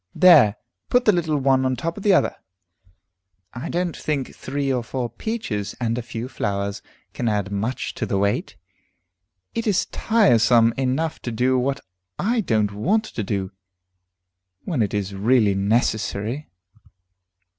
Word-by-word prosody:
"There, 155 Hz, -, +7 dB, 0.3 s
put 245 Hz, 0 st, +3 dB
the 210 Hz, -, +6 dB
little 165 Hz, -5 st, 0 dB
one 135 Hz, -1 st, +2 dB
on 130 Hz, 0 st, +1 dB
the -, -, -4 dB
top 165 Hz, 0 st, -2 dB
of -, -, -8 dB
the 205 Hz, -, +3 dB
other. 185 Hz, -, +3 dB, 1.2 s
I 120 Hz, -, -6 dB
don't 175 Hz, -1 st, -1 dB
think 145 Hz, -4 st, -3 dB
three 140 Hz, 0 st, -2 dB
or 125 Hz, -2 st, -1 dB
four 120 Hz, 0 st, -4 dB
peaches 115 Hz, -, -4 dB
and 115 Hz, -2 st, 0 dB
a 125 Hz, -, -2 dB
few 115 Hz, +1 st, -6 dB
flowers 100 Hz, -5 st, -3 dB, 0.3 s
can 120 Hz, -, -1 dB
add 105 Hz, -2 st, -1 dB
much 110 Hz, +6 st, -2 dB
to 110 Hz, -, -3 dB
the 100 Hz, -, 0 dB
weight. 100 Hz, +1 st, -1 dB, 1.0 s
It 230 Hz, 0 st, -2 dB
is 200 Hz, -3 st, +2 dB
tiresome 120 Hz, -, +3 dB
enough 135 Hz, +5 st, -1 dB
to 120 Hz, -, -4 dB
do 125 Hz, +3 st, +1 dB
what 135 Hz, +2 st, -1 dB, 0.4 s
I 230 Hz, +4 st, +1 dB
don't 110 Hz, -, +1 dB
want 190 Hz, -, +1 dB
to 215 Hz, -, -5 dB
do, 95 Hz, -2 st, -3 dB, 1.1 s
when 155 Hz, -10 st, -1 dB
it 105 Hz, -1 st, 0 dB
is 100 Hz, -1 st, -2 dB
really 105 Hz, +1 st, +3 dB
necessary." 110 Hz, +5 st, -1 dB
125 Hz, 155 wpm, -22 LUFS, 105-155 Hz, 1.2 s, There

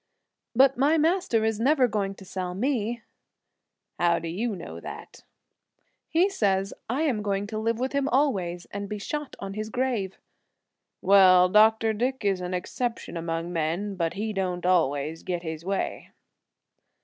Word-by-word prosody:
"But 270 Hz, +1 st, +5 dB
my 295 Hz, +4 st, +4 dB
Master 315 Hz, -, +2 dB
is 220 Hz, -1 st, 0 dB
never 265 Hz, +1 st, +4 dB
going 200 Hz, -3 st, -2 dB
to 190 Hz, -, -13 dB
sell 180 Hz, -1 st, -4 dB
me!" 235 Hz, 0 st, -1 dB, 1.0 s
"How 170 Hz, -1 st, +3 dB
do 170 Hz, -, -5 dB
you 210 Hz, +6 st, -2 dB
know -, -, -8 dB
that?" -, -, -9 dB, 0.9 s
"He 340 Hz, +4 st, +4 dB
says 195 Hz, -, 0 dB, 0.2 s
I 265 Hz, +7 st, 0 dB
am 255 Hz, -9 st, 0 dB
going 200 Hz, -1 st, -1 dB
to 215 Hz, +1 st, -4 dB
live 225 Hz, +1 st, 0 dB
with 260 Hz, +3 st, -2 dB
him 280 Hz, 0 st, +1 dB
always, 190 Hz, -11 st, 0 dB
and 200 Hz, 0 st, -5 dB
be 210 Hz, -, -3 dB
shot 295 Hz, +8 st, -5 dB
on 195 Hz, 0 st, -6 dB
his 215 Hz, +1 st, -4 dB
grave." 245 Hz, -6 st, -1 dB, 0.9 s
"Well, 185 Hz, -2 st, +7 dB
Dr. 220 Hz, +2 st, +5 dB
Dick 250 Hz, +2 st, -2 dB
is 195 Hz, -2 st, +1 dB
an 180 Hz, 0 st, -3 dB
exception 235 Hz, +4 st, -3 dB
among 165 Hz, +1 st, -3 dB
men; 170 Hz, +5 st, -1 dB
but 170 Hz, -3 st, -2 dB
he 215 Hz, +2 st, -2 dB
don't 180 Hz, -2 st, -2 dB
always 160 Hz, -3 st, +1 dB
get 175 Hz, -1 st, -3 dB
his 160 Hz, -1 st, -5 dB
way." 195 Hz, +2 st, -3 dB
205 Hz, 160 wpm, -26 LUFS, 180-240 Hz, 1.0 s, Well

